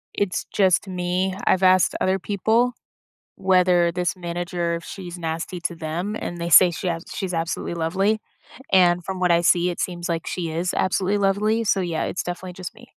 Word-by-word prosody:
It's 200 Hz, -3 st, -1 dB
just 190 Hz, -1 st, +2 dB
me. 185 Hz, +1 st, -1 dB
I've 190 Hz, 0 st, +2 dB
asked 185 Hz, 0 st, +4 dB
other 190 Hz, +1 st, +1 dB
people 220 Hz, +6 st, +1 dB, 0.6 s
whether 180 Hz, -2 st, +3 dB
this 180 Hz, 0 st, -1 dB
manager 175 Hz, -1 st, -3 dB
if 170 Hz, -, -8 dB
she's 180 Hz, -2 st, -8 dB
nasty 165 Hz, +2 st, -4 dB
to 175 Hz, 0 st, -3 dB
them, 170 Hz, +6 st, -4 dB
and 175 Hz, -, -5 dB
they 170 Hz, 0 st, -3 dB
say 180 Hz, +1 st, +8 dB
she 175 Hz, +2 st, -4 dB
has 165 Hz, 0 st, -3 dB
she's 185 Hz, -2 st, -3 dB
absolutely 165 Hz, +1 st, -2 dB
lovely, 195 Hz, +6 st, 0 dB, 0.5 s
and 180 Hz, -2 st, +4 dB
from 190 Hz, -1 st, -5 dB
what 180 Hz, -1 st, +2 dB
I 170 Hz, 0 st, +5 dB
see, 175 Hz, +1 st, +3 dB
it 175 Hz, -, -6 dB
seems 175 Hz, -1 st, -3 dB
like 165 Hz, -1 st, -2 dB
she 170 Hz, -3 st, -3 dB
is 170 Hz, +3 st, -2 dB
absolutely 190 Hz, +2 st, +1 dB
lovely, 210 Hz, +3 st, +1 dB
so, 195 Hz, -2 st, +2 dB
yeah, 170 Hz, -3 st, -2 dB
it's -, -, -3 dB
definitely 180 Hz, 0 st, -6 dB
just 185 Hz, -1 st, -7 dB
me. 240 Hz, +2 st, -16 dB
180 Hz, 190 wpm, -23 LUFS, 170-190 Hz, 0.6 s, say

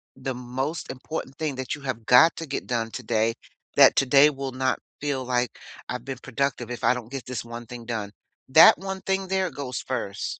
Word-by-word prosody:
the 130 Hz, -1 st, -4 dB
most 130 Hz, +6 st, -4 dB
important 135 Hz, +1 st, -6 dB
thing 150 Hz, -4 st, -2 dB
that 130 Hz, -1 st, -4 dB
you 150 Hz, -, -7 dB
have 120 Hz, -5 st, -4 dB
got 160 Hz, +7 st, +7 dB
to 165 Hz, -, -5 dB
get 140 Hz, -, -4 dB
done 115 Hz, -2 st, -1 dB
today 115 Hz, -2 st, 0 dB, 0.4 s
that -, -, +7 dB
today 140 Hz, +2 st, +6 dB
will 135 Hz, -2 st, -5 dB
not 130 Hz, +1 st, 0 dB, 0.2 s
feel 140 Hz, -3 st, -2 dB
like 125 Hz, -1 st, +1 dB, 0.4 s
I've 125 Hz, 0 st, -4 dB
been 135 Hz, -2 st, -5 dB
productive 130 Hz, -2 st, -2 dB
if 125 Hz, -, -6 dB
I -, -, +5 dB
don't 120 Hz, -1 st, -7 dB
get 135 Hz, -2 st, -6 dB
this 125 Hz, -2 st, -4 dB
one 120 Hz, 0 st, -8 dB
thing 120 Hz, 0 st, -9 dB
done. 110 Hz, -4 st, -4 dB, 0.4 s
That 155 Hz, +3 st, +8 dB
one 190 Hz, +1 st, -5 dB
thing 195 Hz, 0 st, -1 dB
there 190 Hz, -2 st, +1 dB
goes 130 Hz, -3 st, -5 dB
first. 100 Hz, -6 st, -4 dB
130 Hz, 200 wpm, -25 LUFS, 120-140 Hz, 0.4 s, That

